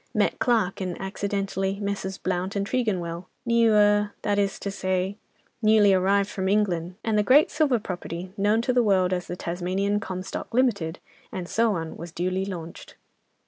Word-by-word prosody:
Met - - +1
Clarke 220 -6 +1
and 180 -2 -3
accidentally 195 0 -2
Messrs. 200 -2 -3
Blount 185 +1 -2
and 200 0 0
Tregonwell, 185 -8 -2 0.2
new—er—that 210 -3 +3
is 200 -1 0
to 200 - -4
say, 190 +1 -2 0.4
newly 215 -2 +5
arrived 195 +2 +3
from 190 -2 -2
England, 185 -4 0
and 220 -2 +1
the - - +5
great 265 +8 +5
silver 295 -5 +2
property, 180 -2 -6
known 210 +2 +2
to 250 - +1
the 245 - +4
world 190 -4 +3
as 180 -1 -2
the 175 - -4
'Tasmanian 185 +4 -1
Comstock, 185 -1 -5
Limited,' 200 -10 +1 0.3
and 180 -2 -5
so 225 0 +2
on 165 -1 -5
was 170 0 -8
duly 185 +2 -1
launched." 170 -4 -8
195 Hz, 160 wpm, -25 LUFS, 185-210 Hz, 0.4 s, newly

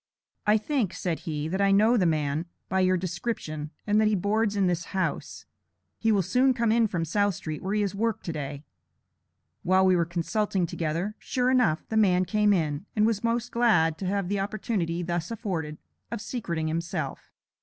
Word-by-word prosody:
"I 210 +1 +6
think," 220 - -1
said 170 -3 -2
he, 150 -1 -2
"that 190 +4 -1
I 200 - +4
know 215 +5 +5
the 185 -7 +3
man, 155 +1 0 0.2
by 190 - +1
your 185 0 +3
description, 175 -4 -4 0.2
and 210 +1 +3
that 215 - +4
he 215 - +2
boards 210 +2 +1
in 200 -2 +2
this 175 -1 0
house. 185 - -2 0.5
He 225 - +2
will 200 -3 +3
soon 255 +7 +3
come 230 -2 +1
in 230 0 +4
from 170 -5 -2
South 205 +3 +1
Street, 155 -1 -5
where 195 +3 -2
he 210 - +2
has 200 -1 -1
worked 225 +2 -1
to 165 - -3
day." 145 -1 -5 1.0
While 185 +1 +3
we 185 -1 +5
were 170 -1 +2
consulting 180 +3 -1
together, 170 +5 -2
sure 250 0 0
enough, 235 -12 +2
the 220 - 0
man 185 -4 +4
came 210 +1 +2
in, 160 -1 0
and 215 -1 +3
was 220 -1 0
most 235 +1 0
glad 170 -10 +3
to 190 - -3
have 200 -1 -1
the 200 +1 -1
opportunity 195 -4 -2
thus 175 -1 -2
afforded, 175 -10 -4 0.3
of - - -3
secreting 180 -8 -3
himself. 165 +2 -4
190 Hz, 195 wpm, -27 LUFS, 170-215 Hz, 1.0 s, I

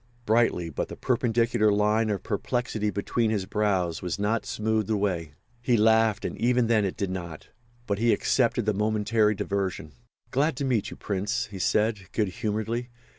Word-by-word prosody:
Brightly, 110 -7 +2
but - - -3
the - - -8
perpendicular 115 -2 +1
line 105 +2 +2
of 100 -2 -2
perplexity 110 0 -1
between 110 +3 0
his 105 -4 -1
brows 95 -6 0
was 90 -2 -3
not 105 +2 -1
smoothed 110 -1 -1
away. 90 -8 -1 0.3
He 120 -1 +2
laughed, 110 -1 +3
and - - -3
even 125 +1 +3
then 110 -3 +2
it 95 - -3
did 100 -2 -2
not. 85 -4 -7 0.4
But 100 -2 -1
he 115 +1 +3
accepted 120 -2 +1
the 105 - +2
momentary 105 +1 +1
diversion. 95 -6 -3 0.4
"Glad 145 +3 +1
to 140 - -1
meet 120 -6 0
you, - - -10
Prince," 105 +5 -2
he 95 - -7
said, 105 -1 0
good 105 -4 +1
humouredly. 110 +3 -3
105 Hz, 170 wpm, -26 LUFS, 100-115 Hz, 0.4 s, laughed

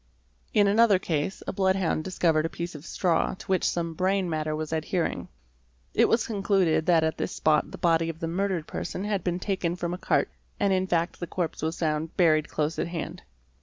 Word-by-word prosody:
In 205 -1 +4
another 205 0 +5
case 165 0 -2
a - - -3
bloodhound 190 -4 +1
discovered 165 -3 +1
a - - -10
piece 170 +1 -5
of 150 0 -10
straw 175 -2 +1
to - - -12
which 190 -2 +1
some 170 -1 -2
brain 185 +2 +1
matter 155 -2 -1
was 155 +1 -4
adhering. 160 +2 -1 0.7
It - - +4
was 230 0 +2
concluded 195 -7 +1
that 170 -3 +5
at 160 0 -1
this - - -2
spot 155 -1 +2
the - - -9
body 165 -1 +2
of 165 -1 -6
the 165 - -2
murdered 180 -1 -1
person 185 - -4
had 205 -2 -1
been 175 -1 0
taken 185 -3 -1
from 175 -1 -3
a 180 - -5
cart, - - +1 0.3
and 200 -1 +2
in 185 0 +1
fact 170 -1 0
the 175 - -4
corpse 175 -2 -3
was 160 +2 -2
found 155 0 -2
buried 155 -4 +3
close 155 +1 -1
at - - 0
hand. 170 0 -5
170 Hz, 205 wpm, -27 LUFS, 160-190 Hz, 0.7 s, another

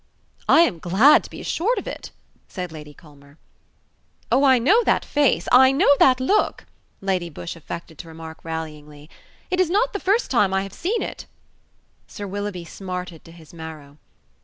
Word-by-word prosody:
"I 325 - +7
am 180 - +1
glad 195 - +5
to - - -11
be - - -10
assured 440 +9 -1
of - - -4
it," - - -7 0.4
said 180 -3 -6
Lady 150 -2 -10
Culmer. 145 -1 -19 0.9
"Oh, 275 - +3
I 265 -2 +6
know 390 - +3
that - - +1
face: 290 -3 +1
I 260 +1 +7
know 275 +1 +3
that 255 -1 +5
look," 265 +12 0 0.4
Lady 185 -3 -1
Busshe 170 +2 -7
affected 165 0 -9
to 170 - -9
remark 160 0 -10
rallyingly: 150 -2 -8 0.4
"it 365 - 0
is 370 -3 +3
not 450 +7 +1
the 405 - -3
first 405 +6 0
time 205 -7 +2
I 190 - +1
have 195 - -9
seen 425 +7 -2
it." - - -7 0.8
Sir 205 - -8
Willoughby 200 -2 -5
smarted 180 -1 -7
to 165 - -13
his 165 -1 -16
marrow. 155 -3 -10
185 Hz, 175 wpm, -22 LUFS, 160-270 Hz, 0.9 s, I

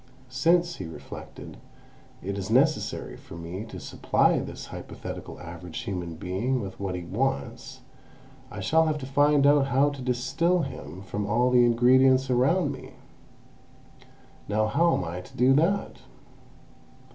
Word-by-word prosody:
"Since," 170 +6 +2
he 95 - -6
reflected, 80 - -10 0.7
"it 100 +2 -3
is 100 0 -5
necessary 140 +7 +1
for - - -12
me 85 +5 -6
to 110 - -9
supply - - +1
this - - -7
hypothetical - - -8
average 85 -1 -7
human 90 -4 -4
being 105 +11 -1
with 100 -4 -7
what 95 -2 -3
he 90 - -5
wants, 130 +5 -3 0.7
I 100 - -7
shall 160 +11 +3
have 155 -1 0
to 140 - -6
find 145 +1 +3
out 145 -1 +5
how 140 +2 +3
to 140 -2 -8
distil 135 +8 +1
him 95 - -7
from 100 +1 -4
all 120 +4 +2
the 125 -1 +6
ingredients 130 +2 +4
around 140 +6 +2
me. 135 - -9 1.5
Now 110 +1 +1
how 165 +9 +2
am - - -2
I 85 +1 -5
to 90 - -15
do 125 +2 +5
that? 170 +8 +1
125 Hz, 145 wpm, -26 LUFS, 95-140 Hz, 1.5 s, the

